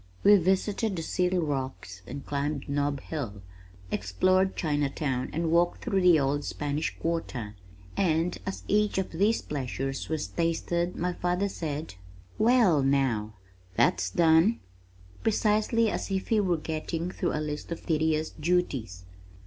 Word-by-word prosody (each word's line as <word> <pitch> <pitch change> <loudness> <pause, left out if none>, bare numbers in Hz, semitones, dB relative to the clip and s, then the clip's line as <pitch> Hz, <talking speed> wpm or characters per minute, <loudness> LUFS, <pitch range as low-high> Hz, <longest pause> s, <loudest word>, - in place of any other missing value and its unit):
We 205 +1 +8
visited 195 +3 +1
the 165 - -3
Seal 180 +2 +1
Rocks 130 - -4
and 140 +2 -7
climbed 145 0 -2
Nob 140 -1 -1
Hill, 110 -11 -5 0.5
explored 185 - +2
Chinatown 145 -4 -1
and 165 0 -1
walked 175 +1 +2
through 195 -1 +1
the 175 -3 +6
Old 140 +1 0
Spanish 145 +1 -3
Quarter, 135 -10 -3 0.4
and 165 -1 +1
as 190 - -5
each 210 0 +2
of 190 - -1
these 205 +7 +1
pleasures 135 -1 -4
was 160 -2 -1
tasted 170 +1 -1
my 180 +1 -1
father 180 +3 0
said, 155 - -4 0.5
"Well 220 - +5
now, 130 -6 +1 0.4
that's 95 - +2
done!" 165 - +4 0.6
precisely 220 +1 +2
as - - -3
if 190 -1 -2
he 225 - +3
were 180 -4 +2
getting 160 +2 -3
through - - -2
a - - -1
list 150 +1 -4
of 170 - -5
tedious 155 -1 +1
duties. 135 - -1
160 Hz, 140 wpm, -28 LUFS, 140-185 Hz, 0.6 s, We